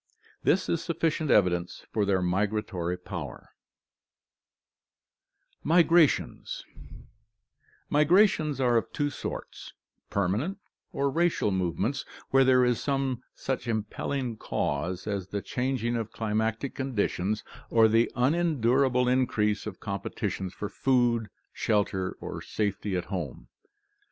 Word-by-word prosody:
This 185 +3 +2
is 170 - 0
sufficient 160 -2 0
evidence 90 -5 +2
fcfr 105 -2 +1
their 95 -2 +2
migratory 95 -2 -1
powers. 90 - -7 2.1
62 - - -4
ORGANIC 170 0 +6
EVOLUTION 165 -2 +5
Migrations - - -9 1.2
Migrations 155 -2 +4
are 120 -2 +3
of 115 - -1
two 145 -1 -1
sorts: - - -7 0.4
permanent 105 - 0 0.3
or 140 0 0
racial 165 -9 +2
movements 95 +8 -1 0.3
where 135 0 +6
there 130 -1 +5
is 125 -2 +1
some 135 -3 -1
such 130 -2 -3
impelling 115 +3 -2
cause 85 +3 -2
as 100 -3 -3
the 100 +1 -4
changing 125 -2 -1
of 115 -2 -3
climatic 110 +4 -1
conditions, 110 -5 -1 0.3
or 115 -1 +6
the 115 +2 +3
unendurable 130 -3 +2
increase 110 -5 +1
of 100 - -7
competition 100 -1 -3
for 105 - -5
food, 120 -1 +1 0.2
shelter, 100 -3 0
or - - -6
safety 100 -2 -2
at 90 - -3
home. 85 - -5
115 Hz, 115 wpm, -28 LUFS, 100-135 Hz, 2.1 s, ORGANIC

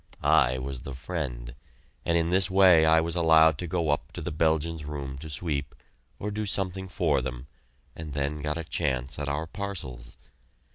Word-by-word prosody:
I 65 -5 +4
was 65 -1 -5
the 70 0 -7
friend, 65 -5 -5 0.5
and 85 - +2
in 85 +1 0
this 95 +1 +3
way 95 -4 +6
I 80 0 +5
was 85 +1 -1
allowed 80 -2 +5
to 90 - -3
go 85 -3 0
up 75 - -2
to - - -6
the - - -3
Belgians' 80 +1 0
room 70 -2 -5
to 80 +2 -8
sweep, 75 -1 -3 0.4
or 105 - -4
do 105 0 -3
something 95 0 0
for 80 -6 +1
them, 60 0 -5 0.5
and 80 -3 -7
then 70 +1 -2
got 75 +2 -2
a 85 - -4
chance 70 -5 -2
at 70 -1 -2
our 75 +3 -2
parcels. 75 - -6
80 Hz, 185 wpm, -27 LUFS, 70-85 Hz, 0.5 s, way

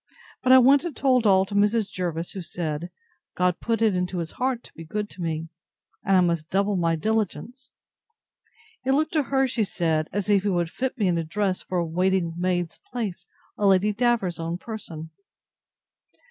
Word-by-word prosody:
But 255 - +3
I 260 - +10
went 270 +2 +6
and 340 -4 -5
told 255 -4 +3
all 190 -1 +5
to 195 - -9
Mrs. 205 0 +2
Jervis, 170 -2 -3
who 195 - -6
said, 170 -1 -4 0.5
God 180 -1 +1
put 230 -1 0
it 215 -4 +3
into 180 0 -2
his 165 -2 -3
heart 250 -1 -2
to - - -15
be 165 - -10
good 210 +6 -4
to 185 - -10
me; 165 -1 -3 0.5
and 195 -3 +3
I - - +5
must 170 -3 0
double 200 +1 +1
my 165 -2 +1
diligence. 220 - -2 1.1
It 265 +1 +2
looked 310 +3 +1
to 310 - +3
her, 270 -1 +3
she 240 -3 0
said, 160 -5 -1
as 205 0 -2
if 205 -2 +4
he 205 - -1
would 175 -3 0
fit 260 +1 -3
me 210 -5 +1
in 170 -2 +1
dress 195 +1 -1
for 185 - -4
a 170 - +1
waiting 180 +1 0
maid's 175 -1 -1
place 190 -7 -4 0.3
on 205 -1 +4
Lady 195 +2 +3
Davers's 225 -6 +1
own 165 +1 -3
person. 175 -7 -8
190 Hz, 190 wpm, -25 LUFS, 170-225 Hz, 1.1 s, I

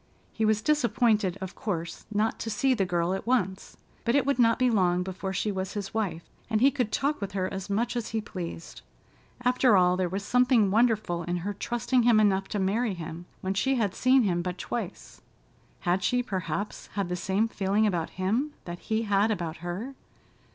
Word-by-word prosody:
He 220 - 0
was 215 0 +2
disappointed, 230 -9 +2
of 190 -1 -5
course, 170 -5 -4
not 215 +1 0
to 225 - -4
see 265 +4 +2
the 195 -6 0
girl 175 +1 0
at 195 - -4
once, 190 -7 -1 0.3
but 235 - +1
it 280 - +3
would 280 -1 +1
not 230 -1 +5
be 255 -1 +3
long 180 -4 +2
before 190 +1 -4
she 205 +2 -1
was 190 0 -3
his 200 -2 -5
wife, 200 -7 -2 0.3
and 220 -2 +2
he 270 +4 +5
could 250 -6 -1
talk 285 +3 0
with 200 -1 -4
her 185 -2 0
as 190 +1 -5
much 230 +5 0
as 235 -2 -2
he 220 - -1
pleased. 175 -5 -7 0.6
After 250 -3 +4
all, 180 0 +4
there 180 -1 0
was 195 +3 -4
something 250 -5 +3
wonderful 215 -6 +2
in 175 +1 -2
her 205 - -1
trusting 240 +4 0
him 230 -2 +5
enough 195 -2 +2
to - - -3
marry 200 +2 0
him, 165 +1 -7
when 190 +1 -1
she 265 +7 +1
had 210 -6 0
seen 255 0 +4
him 175 -4 +1
but 180 0 -4
twice. 220 -3 -6 0.6
Had 180 +2 +1
she, 245 +4 +2
perhaps, 190 -2 -4
had 200 -3 -1
the 180 - -2
same 195 +5 0
feeling 205 0 +1
about 175 -6 0
him 230 +11 0
that 175 0 -6
he 220 0 -1
had 205 0 +2
about 170 -6 -2
her? 175 - -5
205 Hz, 200 wpm, -27 LUFS, 185-235 Hz, 0.6 s, not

